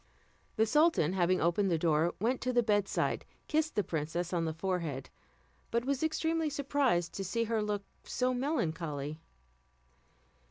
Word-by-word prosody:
The 220 - +4
sultan 295 - +3
having 185 0 +2
opened 175 +4 +2
the 170 - +2
door, 160 +1 +2
went 240 +6 0
to 255 - 0
the 240 -1 +3
bedside, 205 -3 +1 0.2
kissed 315 0 0
the 210 - +2
princess 170 +2 -2
on 170 -2 +1
the 160 - -1
forehead, 170 -6 -3 0.6
but 235 +1 0
was 275 -1 0
extremely 320 0 0
surprised 275 - +1
to 195 - -3
see 230 +5 0
her 225 -1 0
look 210 -1 -2 0.2
so 255 0 0
melancholy. 165 - -2
205 Hz, 150 wpm, -32 LUFS, 170-255 Hz, 0.6 s, The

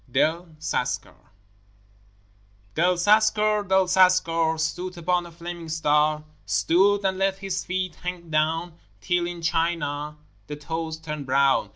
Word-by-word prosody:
DEL 160 +5 0
CASCAR 125 -4 -2 1.6
Del 180 +3 +2
Cascar, 210 +1 +3
Del 190 0 +4
Cascar, 175 -3 +3
Stood 175 +3 -3
upon 175 +1 0
a - - -13
flaming 170 0 -8
star, 150 -1 +1 0.2
Stood, 175 - +2
and 190 0 0
let 195 0 +1
his 195 -2 -3
feet 185 -1 -3
hang 180 -2 -6
down 160 +2 0 0.2
Till 175 - 0
in 175 -1 -7
China 150 -3 -1 0.3
the 150 - -5
toes 160 +1 -4
turned 150 -3 -6
brown. 135 +1 +3
170 Hz, 130 wpm, -24 LUFS, 155-185 Hz, 1.6 s, Del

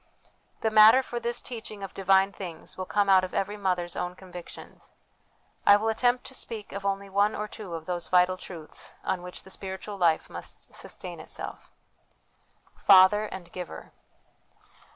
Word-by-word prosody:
The 220 - +1
matter 220 +4 +8
for 240 -1 -4
this 235 0 -1
teaching 220 -4 -7
of 195 - -6
divine 195 0 +3
things 175 -5 -8
will 185 -1 -5
come 205 -1 +2
out 190 -1 +6
of 185 - -5
every 205 +2 -1
mother's 180 -4 -1
own 180 0 -3
convictions. 180 -2 -11 0.7
I 205 - +8
will 215 +2 +1
attempt 245 +2 +1
to - - -9
speak 225 -5 -5
of 200 0 -6
only 200 0 -1
one 200 +2 +2
or 210 - -3
two 200 -5 -7
of 160 -1 -7
those 175 -2 -2
vital 180 0 +4
truths 170 -4 -9
on 180 - -1
which 180 0 -7
the 190 - -11
spiritual 195 +2 -6
life 170 -4 +2
must - - -8
sustain - - -6
itself. - - -7 1.1
Father 200 +2 +6
and 185 -4 -8
Giver. 180 -2 -8
195 Hz, 165 wpm, -27 LUFS, 180-210 Hz, 1.1 s, matter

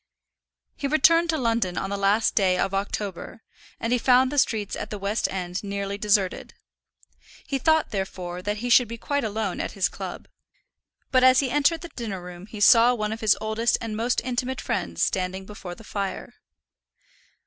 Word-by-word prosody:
He 280 - -3
returned 330 +3 +4
to 320 - +1
London 230 -8 0
on 195 - -3
the - - -1
last 200 +3 +2
day 185 -3 +2
of 195 +1 -1
October, 200 +1 -4 0.4
and 230 +2 -1
he 250 - +2
found 255 +2 +4
the 290 - +2
streets 215 -6 0
at - - -6
the 210 - -5
West 200 +3 -1
End 180 0 -4
nearly 200 0 -3
deserted. 200 -2 0 0.9
He 275 - -2
thought, 315 +3 +2
therefore, 180 -3 -4
that 205 +3 -2
he - - -1
should 245 0 +6
be 230 +2 -7
quite 285 +4 -2
alone 215 -3 -2
at - - -4
his 195 - +1
club, - - -7 0.8
but 255 -1 +4
as 255 0 +7
he 265 -3 0
entered 295 +3 +2
the 345 - -8
dinner 220 - -5
room 180 +1 -10
he 215 - -9
saw 235 +2 +6
one 215 -1 -2
of 225 - -8
his 215 -2 +3
oldest 220 +2 0
and 225 -2 -5
most 235 +3 0
intimate 255 +1 -2
friends 85 -1 -2
standing 190 0 -2
before 190 -3 -8
the 225 - -14
fire. 200 -2 -5
215 Hz, 185 wpm, -25 LUFS, 195-250 Hz, 0.9 s, as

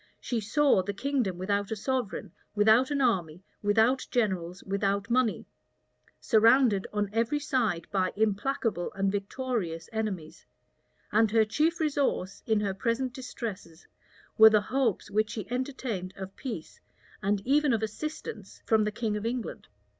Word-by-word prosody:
She 240 - -2
saw 270 0 +3
the 200 +2 -4
kingdom 250 -7 -1
without 200 +2 -1
a 220 - -2
sovereign, 245 0 -3 0.2
without 220 +5 +5
an 285 -1 0
army, 180 -8 0 0.2
without 220 +5 +2
generals, 190 -6 -1
without 200 +2 -1
money; 250 -3 +1 0.7
surrounded 225 -2 +4
on 205 -1 -1
every 230 +6 +1
side 235 - 0
by 185 -2 +1
implacable 215 -2 0
and 195 0 0
victorious 200 -5 -3
enemies; 200 -8 -4 0.7
and 220 +1 +4
her 220 +1 +4
chief 310 +10 +1
resource, 285 - 0
in 220 -2 +2
her 200 -2 -1
present 240 +5 -1
distresses, 215 -10 -7 0.5
were 220 0 +11
the 215 -1 +4
hopes 235 -3 -1
which 215 +1 +1
she 210 -3 -5
entertained 250 -8 -3
of 190 0 -7
peace 230 - -7 0.4
and 200 0 0
even 290 +2 +3
of 225 -2 +1
assistance 220 -3 -6
from 220 -1 +3
the 210 - -1
king 215 0 -2
of 210 - -3
England. 235 0 -4
215 Hz, 145 wpm, -28 LUFS, 195-250 Hz, 0.7 s, were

